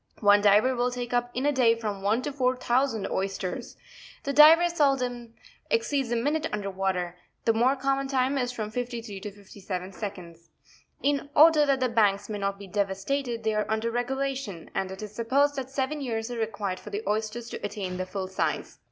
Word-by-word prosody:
One 205 -1 +6
diver 210 +6 +4
will 245 +1 +1
take 245 0 -5
up 245 0 +1
in 255 +3 -1
a 290 - +4
day 245 -4 +4
from 210 -3 -4
one 215 +5 +1
to 295 - -2
four 255 -2 +1
thousand 250 -3 0
oysters. 190 -1 -3 0.5
The 280 - -2
diver 320 +4 +8
seldom 250 -7 0 0.3
exceeds 285 - 0
a - - +2
minute 295 +6 0
under 205 -2 -3
water; 185 -2 -2 0.3
the 225 - +4
more 245 +5 +3
common 275 0 0
time 265 0 +1
is 245 -1 -1
from 215 -3 -5
53 235 -4 -4
to 210 +2 -6
57 195 -2 -7
seconds. 180 -5 -8 0.5
In 285 0 0
order 305 -1 +7
that 270 -2 +2
the 255 - +3
banks 205 -3 +2
may 210 -1 -3
not 200 0 -1
be 200 - -10
devastated, 210 +6 -2
they: 220 0 +1
are 215 0 -1
under 220 +1 0
regulation, 255 -6 -3
and 190 - -1
it 190 +2 -7
Is 210 -1 -8
sup 230 +1 -5
posed 285 +2 +3
that 265 -1 -4
seven 275 +2 -2
years 230 -2 -3
are 240 - -4
required 200 -4 -2
for - - -10
the 205 +2 -4
oyster 215 +3 -1
to 230 - -8
attain 195 -3 -4
its 185 0 -4
full 190 -1 -3
size. 190 - -2
230 Hz, 200 wpm, -27 LUFS, 200-265 Hz, 0.5 s, diver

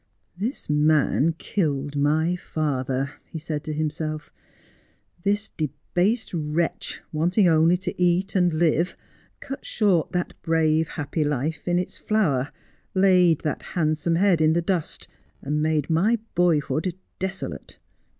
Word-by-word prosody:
' - - -45
This 255 - -4
man 150 +1 +3
killed 145 -8 -1
my 155 +4 +2
father,' 135 -5 -2 0.2
he 165 - -6
said 155 -1 -4
to 155 - -3
himself. 155 0 -3 0.4
' 170 - -35
This 205 +1 +1
debased 175 - -1
wretch, 160 0 -2
wanting 175 +6 +3
only 165 +2 +4
to 180 0 -5
eat 180 +3 +2
and 180 -2 +4
live, 165 +2 +1 0.4
cut 270 - -6
short 190 -7 +1
that 180 -1 -1
brave 160 -1 +2
happy 155 +1 -2
life 150 +3 -2
in 175 0 +2
its 180 - -3
flower, 150 -11 +1 0.4
laid 180 -4 +5
that 150 - -2 0.2
handsome 155 +1 +1
head 180 -2 +3
in 155 0 +4
the 170 - +2
dust, 175 -3 -2 0.3
and 150 +2 -1
made 155 -2 +1
my 190 +9 +3 0.2
boyhood 165 -1 +1 0.2
desolate. 190 +1 -5
160 Hz, 135 wpm, -24 LUFS, 150-180 Hz, 0.4 s, laid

